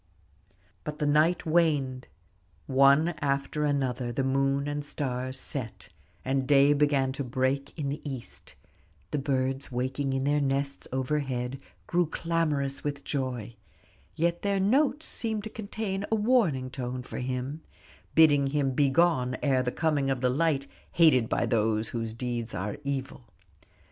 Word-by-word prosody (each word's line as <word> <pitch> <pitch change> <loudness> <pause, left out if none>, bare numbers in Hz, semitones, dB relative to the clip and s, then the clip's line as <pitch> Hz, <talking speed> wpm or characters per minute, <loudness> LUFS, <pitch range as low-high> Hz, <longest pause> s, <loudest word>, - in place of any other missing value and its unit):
But 150 0 -5
the 150 - -1
night 155 +5 +3
waned: 150 -6 +1 0.6
one 140 +4 +5
after 140 +2 0
another 130 -4 -1
the 135 +3 -1
moon 135 +1 +1
and 145 0 -2
stars 130 -2 -3
set 125 -6 -5 0.4
and 135 0 0
day 140 0 +6
began 140 -2 +2
to 140 +1 -4
break 130 +3 -1
in 145 -3 -2
the 145 +2 -4
east; 135 -5 -7 0.6
the 150 - 0
birds 135 0 -1
waking 130 +2 -1
in 135 0 0
their 145 +1 +2
nests 140 0 -1
overhead 130 -1 -2 0.3
grew 175 -1 +1
clamorous 150 -5 -1
with 145 -1 -3
joy, 125 -5 -3 0.6
yet 170 +1 0
their 200 -1 +1
notes 275 +9 +2
seemed 220 -3 -1
to 220 - -7
contain 200 -2 -4
a - - +4
warning 205 - +2
tone 125 -1 -4
for - - -6
him, 130 +4 -3 0.5
bidding 145 -3 +6
him 140 -1 0
begone 135 -2 +2
ere 135 -3 +3
the 125 -1 -1
coming 150 -3 0
of 135 -2 -1
the 125 -1 +2
light 145 -1 +1 0.3
hated 140 -9 +5
by - - +1
those 110 -1 +1
whose 115 -1 -4
deeds 120 -2 -4
are 100 +3 -3
evil. 135 -2 -4
140 Hz, 145 wpm, -28 LUFS, 130-150 Hz, 0.6 s, day